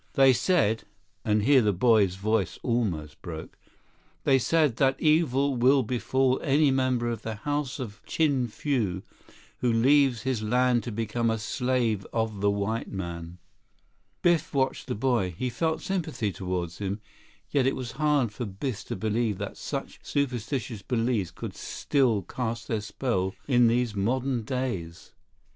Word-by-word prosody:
They 135 -1 +6
said"—and 110 - 0
here 135 +2 +6
the 105 -2 +3
boy's 100 -2 +3
voice 105 0 0
almost 95 - -1
broke—"they 85 - -4
said 150 -2 +2
that 135 -1 +2
evil 140 -4 +3
will 130 +3 +4
befall 130 +2 +1
any 145 0 +3
member 130 -2 +1
of 115 -1 -3
the 110 -1 -4
House 145 +5 -2
of 105 -7 -7
Chin 140 -6 +1
Fu 105 -7 -1 0.6
who 125 - +2
leaves 130 0 +4
his 130 -4 -1
land 125 +2 +2
to 120 - -4
become 115 +2 -1
a 115 - +1
slave 120 -2 0
of 110 -3 -2
the 100 - +3
white 100 +3 -1
man." 85 -2 -6 0.9
Biff 170 -4 +2
watched 135 0 0
the 125 - -2
boy. 110 -7 0
He 125 -1 -2
felt 160 +5 -1
sympathy 140 - -2
toward 90 -1 -3
him, 100 +3 -4 0.5
yet 135 -3 +3
it 135 - +1
was 125 -2 -5
hard 150 -7 +1
for 120 +3 -5
Biff 100 +4 -4
to - - -4
believe 110 +1 0
that - - -5
such - - -5
superstitious 125 -4 -2
beliefs 115 -4 0
could - - -7
still 125 -8 0
cast 115 +2 -4
their 110 -2 -1
spell 100 -3 -2
in 125 -3 +5
these 120 -1 +1
modern 125 +5 0
days. 110 -9 -4
120 Hz, 150 wpm, -27 LUFS, 105-130 Hz, 0.9 s, They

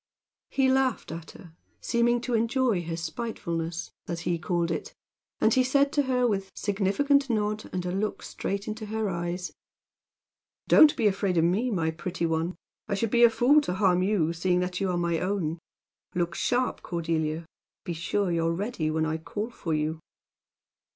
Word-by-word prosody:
He 270 -1 +2
laughed 260 -6 +1
at 165 0 -7
her, 170 -4 -14 0.3
seeming 240 0 +2
to 250 0 -3
enjoy 230 -3 +2
her 165 0 -3
spitefulness, 165 -2 -4 0.2
as 170 -1 -3
he 170 -1 -1
called 170 0 0
it; 465 - -4 0.4
and 220 - +4
he 260 - +4
said 280 +2 +3
to 290 - +3
her, 255 -2 +1
with 195 -4 0
significant 220 +8 +1
nod, 215 -1 -1
and 180 -1 -3
a 180 - -1
look 200 +3 -2
straight 200 +1 -4
into 215 0 -5
her 220 -1 -1
eyes: 175 +1 -3 1.1
"Don't 310 -1 +7
be 230 - +1
afraid 195 -3 +1
of 165 - +4
me, 195 +9 +2
my 165 -7 0
pretty 170 +2 -3
one. 165 +2 -1 0.3
I 200 - 0
should 210 +2 -1
be 240 0 +5
a 235 - +9
fool 265 +6 +4
to 180 -11 -3
harm 185 -3 +3
you, 185 -4 +1
seeing 180 +1 +1
that 180 +1 -3
you 195 - +1
are 180 - 0
my 170 -1 0
own. 180 -4 -1 0.6
Look 175 -1 0
sharp, 250 +6 0
Cordelia. 165 -2 -2 0.4
Be 175 - -3
sure 180 +3 -1
you're 165 0 +1
ready 190 -5 -2
when 160 0 0
I 160 0 -1
call 210 +8 -5
for 165 -8 -3
you!" 155 +1 -1
190 Hz, 180 wpm, -27 LUFS, 170-230 Hz, 1.1 s, a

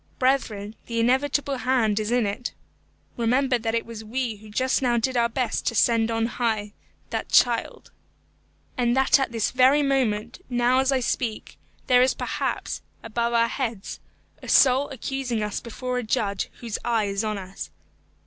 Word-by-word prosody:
Brethren, 225 -6 0
the 230 -1 -2
inevitable 270 +3 +1
hand 240 -5 +1
is 215 0 -2
in 245 -1 +2
it. 205 +5 -3 0.6
Remember 250 +2 +2
that 225 0 -1
it 230 - -1
was 230 -1 -8
we 230 0 -3
who 215 +1 -14
just 255 +6 +1
now 240 -2 +2
did 255 +3 0
our 235 -1 +3
best 235 -1 -2
to 230 - 0
send 230 +1 +3
on 225 0 0
high 220 -3 -2 0.4
that - - -3
child, - - +2 0.8
and 240 0 +1
that 265 +1 +5
at 270 - -1
this 225 -2 0
very 265 +3 +4
moment, 240 - 0
now 245 +1 +2
as 265 +1 +2
I 265 -1 +1
speak, 235 -2 -3 0.3
there 250 -2 +5
is 255 - +3
perhaps, - - -3 0.2
above 235 +1 -1
our 230 0 +4
heads, 230 -5 -4 0.4
a - - -10
soul 265 +1 +5
accusing 265 -4 -3
us 210 - -2
before 250 +2 -4
a - - -4
Judge 200 -3 -1
whose 230 -3 -4
eye 230 -3 +1
is 200 +1 -2
on 215 -1 -2
us. 190 0 -7
235 Hz, 170 wpm, -25 LUFS, 220-255 Hz, 0.8 s, that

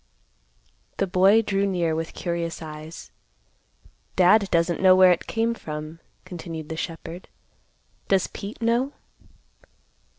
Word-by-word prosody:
The 195 - +1
boy 195 +4 +4
drew 200 -1 0
near 175 -4 0
with 160 +1 -4
curious 170 -1 -3
eyes. 155 +1 -9 1.0
"Dad 195 +2 +5
doesn't 170 +1 +1
know 185 -1 +7
where 185 -1 +7
it 175 - -1
came 230 +1 0
from," 155 -4 -7 0.3
continued 165 -3 -7
the 160 - -4
shepherd. 165 +2 -6 0.8
"Does 195 -2 +3
Pete 210 +4 -8
know?" 240 +5 +1
180 Hz, 120 wpm, -24 LUFS, 165-200 Hz, 1.0 s, know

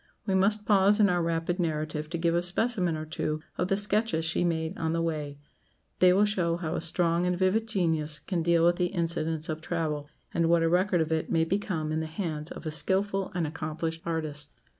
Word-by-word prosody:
We 195 - 0
must 205 +3 +2
pause 205 0 +5
in 205 -1 +5
our 175 -1 +1
rapid 165 +2 -1
narrative 155 -2 -2
to 170 - -3
give 170 0 +1
a 170 - +2
specimen 180 -2 0
or 155 - -5
two 155 0 -3 0.2
of 180 - -1
the 195 - +1
sketches 205 -4 +1
she 165 +2 +1
made 160 -2 -1
on 160 -1 -2
the 165 - 0
way; 150 -3 -3 0.6
they 180 0 +6
will 200 +3 +4
show 175 -5 0
how 165 -3 -3
a - - -2
strong 170 +1 +2
and 180 0 0
vivid 195 +5 +1
genius 160 -7 0
can 175 +1 -3
deal 170 0 +3
with 175 0 +3
the 180 - +1
incidents 165 -3 -2
of 155 -1 -4
travel, 155 -4 -3 0.2
and 170 -1 +1
what 170 -1 +4
a 165 - +2
record 180 0 +2
of 160 0 -2
it 160 0 -1
may 165 -1 +3
become 170 -4 -2
in 155 - 0
the 160 - -3
hands 155 -2 -4
of - - -9
a 155 - -2
skilful 190 +5 +1
and 175 -2 0
accomplished 160 +1 -4
artist. 155 -3 -3
170 Hz, 220 wpm, -28 LUFS, 160-185 Hz, 0.6 s, they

